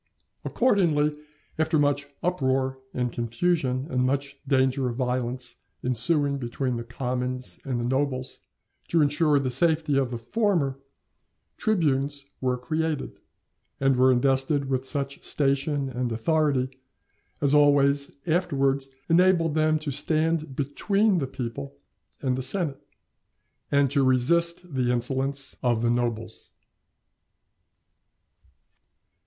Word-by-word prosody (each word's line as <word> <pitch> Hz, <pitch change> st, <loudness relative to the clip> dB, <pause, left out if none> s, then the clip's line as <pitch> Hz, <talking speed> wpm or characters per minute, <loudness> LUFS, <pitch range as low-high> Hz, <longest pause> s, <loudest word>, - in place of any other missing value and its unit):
Accordingly, 160 Hz, -11 st, +2 dB, 0.4 s
after 160 Hz, 0 st, +2 dB
much 145 Hz, -1 st, +1 dB, 0.2 s
uproar 130 Hz, -6 st, 0 dB
and 125 Hz, -1 st, -2 dB
confusion, 130 Hz, +3 st, 0 dB
and 125 Hz, 0 st, +1 dB
much 140 Hz, +2 st, -1 dB
danger 130 Hz, -1 st, +2 dB
of 120 Hz, -, -5 dB
violence 125 Hz, -1 st, -2 dB, 0.3 s
ensuing 140 Hz, +3 st, +1 dB
between 125 Hz, +1 st, -2 dB
the 115 Hz, -, -4 dB
commons 125 Hz, +1 st, -3 dB
and 130 Hz, -3 st, -2 dB
the 120 Hz, -, -2 dB
nobles, 130 Hz, 0 st, -1 dB, 0.5 s
to 165 Hz, -2 st, +3 dB
insure 145 Hz, +1 st, +3 dB
the 135 Hz, -2 st, 0 dB
safety 155 Hz, +1 st, +2 dB
of 130 Hz, -2 st, 0 dB
the 120 Hz, -, -4 dB
former, 145 Hz, -, 0 dB, 0.8 s
tribunes 145 Hz, -, 0 dB, 0.2 s
were 125 Hz, -1 st, 0 dB
created, 155 Hz, +4 st, -3 dB, 0.6 s
and 135 Hz, -1 st, +3 dB
were 130 Hz, +1 st, +5 dB
invested 135 Hz, +2 st, +2 dB
with 130 Hz, 0 st, -1 dB
such 140 Hz, 0 st, -3 dB
station 140 Hz, 0 st, 0 dB
and 125 Hz, -1 st, -3 dB
authority 135 Hz, +1 st, +1 dB, 0.7 s
as 140 Hz, 0 st, +2 dB
always 145 Hz, -1 st, +4 dB
afterwards 140 Hz, -6 st, +1 dB, 0.2 s
enabled 170 Hz, -2 st, +4 dB
them 155 Hz, 0 st, +2 dB
to 155 Hz, -2 st, -4 dB
stand 155 Hz, 0 st, 0 dB
between 195 Hz, +8 st, +1 dB
the 135 Hz, -, -2 dB
people 115 Hz, -, -6 dB, 0.5 s
and 130 Hz, -2 st, +1 dB
the 130 Hz, -, -3 dB
senate, 145 Hz, 0 st, 0 dB, 0.9 s
and 140 Hz, -2 st, +3 dB
to 140 Hz, -1 st, +2 dB
resist 170 Hz, +7 st, +1 dB
the 125 Hz, -2 st, 0 dB
insolence 135 Hz, +3 st, -1 dB
of 120 Hz, -3 st, +1 dB
the 120 Hz, -, +3 dB
nobles. 120 Hz, -2 st, -3 dB
135 Hz, 115 wpm, -26 LUFS, 125-155 Hz, 0.9 s, were